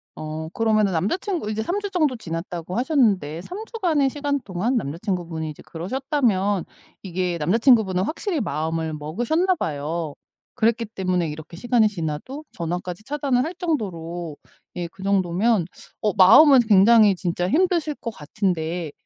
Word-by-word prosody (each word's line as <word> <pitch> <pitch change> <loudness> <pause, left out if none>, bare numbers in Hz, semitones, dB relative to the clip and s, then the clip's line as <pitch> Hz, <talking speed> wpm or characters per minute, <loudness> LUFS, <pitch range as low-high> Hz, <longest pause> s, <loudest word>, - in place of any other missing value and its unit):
어 155 +1 -6
그러면은 215 -2 +2
남자 180 - 0
친구 360 - -3
이제 215 0 -2
3 365 - -1
주 405 -1 -4
정도 305 -7 +1
지났다고 170 0 -5
하셨는데 210 - +1
3 390 - -7
주간의 330 - +1
시간 285 0 -2
동안 200 +7 -2
남자 150 - -2
친구분이 170 -5 -3
이제 150 - -10
그러셨다면 205 - 0 0.4
이게 180 -1 -2
남자 170 +8 +1
친구분은 220 -7 +4
확실히 335 - -2
마음을 160 -2 -2
먹으셨나 240 - 0
봐요. 155 - -3 0.4
그랬기 230 -1 +1
때문에 180 -4 0
이렇게 155 +3 -9
시간이 235 +2 +3
지나도 180 - -5
전화까지 175 +3 -4
차단을 275 -3 0
할 345 - -5
정도로 175 - -3 0.4
예 175 -1 -3
그 190 - -12
정도면 195 +1 +2 0.4
어 210 - +2
마음은 260 +9 +8
굉장히 210 0 +6
진짜 175 0 -2
힘드실 335 - +1
것 230 - -6
같은데 170 -2 -2
195 Hz, 345 characters per minute, -23 LUFS, 170-260 Hz, 0.4 s, 마음은